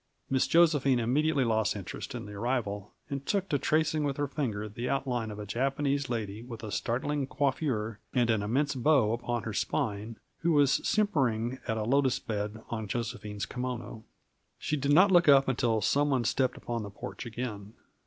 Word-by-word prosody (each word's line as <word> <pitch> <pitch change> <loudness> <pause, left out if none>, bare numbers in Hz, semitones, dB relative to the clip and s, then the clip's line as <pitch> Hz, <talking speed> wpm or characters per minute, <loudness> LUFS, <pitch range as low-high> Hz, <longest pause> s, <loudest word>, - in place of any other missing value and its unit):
Miss 130 -1 +3
Josephine 150 -6 +4
immediately 140 +5 +2
lost 110 -3 +1
interest 100 -4 -6
in - - -5
the 105 - -9
arrival 105 -3 -2 0.2
and 140 -1 -3
took 195 +4 0
to 145 - +1
tracing 155 +1 +1
with 140 -2 -1
her 145 - 0
finger 115 -8 -3
the 120 +4 -4
outline 125 -5 -1
of 105 - -7
a 105 - -6
Japanese 135 +5 0
lady 110 -3 -3
with 115 -2 -9
a 105 - -5
startling 130 +9 -1
coiffure 130 -7 -1
and 120 -2 +2
an 110 -2 +1
immense 135 +8 +1
bow 130 -4 +3
upon 120 0 -2
her 115 - -4
spine, 110 -2 -2 0.2
who 165 0 +2
was 145 -2 +4
simpering 130 - +1
at 110 - 0
a 110 - -1
lotus 135 +2 +2
bed 105 -1 -4
on 110 -2 -3
Josephine's 105 -3 -4
kimono. 125 -3 -5 0.5
She 150 - -2
did 140 0 0
not 185 +6 +6
look 175 -4 +6
up 135 -1 +7
until 120 -4 +1
some 145 +8 +2
one 130 -4 +2
stepped 130 +2 +1
upon 120 -1 -3
the 105 - -6
porch 105 +4 -7
again. 110 -3 -5
125 Hz, 185 wpm, -29 LUFS, 110-140 Hz, 0.5 s, up